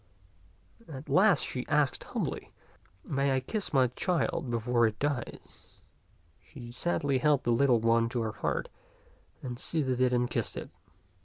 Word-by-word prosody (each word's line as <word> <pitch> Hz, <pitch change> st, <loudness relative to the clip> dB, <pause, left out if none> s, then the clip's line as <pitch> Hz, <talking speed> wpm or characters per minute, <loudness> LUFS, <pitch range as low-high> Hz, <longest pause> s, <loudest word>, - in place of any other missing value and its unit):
At 140 Hz, +1 st, -9 dB
last 185 Hz, +6 st, +5 dB
she 125 Hz, -, -3 dB
asked 150 Hz, -2 st, +1 dB
humbly, -, -, -4 dB, 0.3 s
" 95 Hz, 0 st, -34 dB
May 140 Hz, -1 st, +1 dB
I -, -, +2 dB
kiss 205 Hz, -, -4 dB
my 135 Hz, -3 st, +4 dB
child 165 Hz, -2 st, -1 dB
before 120 Hz, 0 st, +2 dB
it 110 Hz, -1 st, -4 dB
dies 140 Hz, -4 st, -5 dB, 0.4 s
?" 85 Hz, -2 st, -35 dB
She 120 Hz, -5 st, -11 dB
sadly 140 Hz, -1 st, 0 dB
held 145 Hz, -1 st, +3 dB
the 120 Hz, -, +1 dB
little 120 Hz, 0 st, +4 dB
one 115 Hz, 0 st, +3 dB
to 120 Hz, 0 st, -2 dB
her 110 Hz, -1 st, -2 dB
heart, -, -, -2 dB, 0.7 s
and 125 Hz, -1 st, -5 dB
soothed 130 Hz, -6 st, -1 dB
it 125 Hz, -1 st, +4 dB
and 125 Hz, 0 st, +2 dB
kissed -, -, -3 dB
it. -, -, -7 dB
130 Hz, 160 wpm, -30 LUFS, 120-145 Hz, 0.7 s, last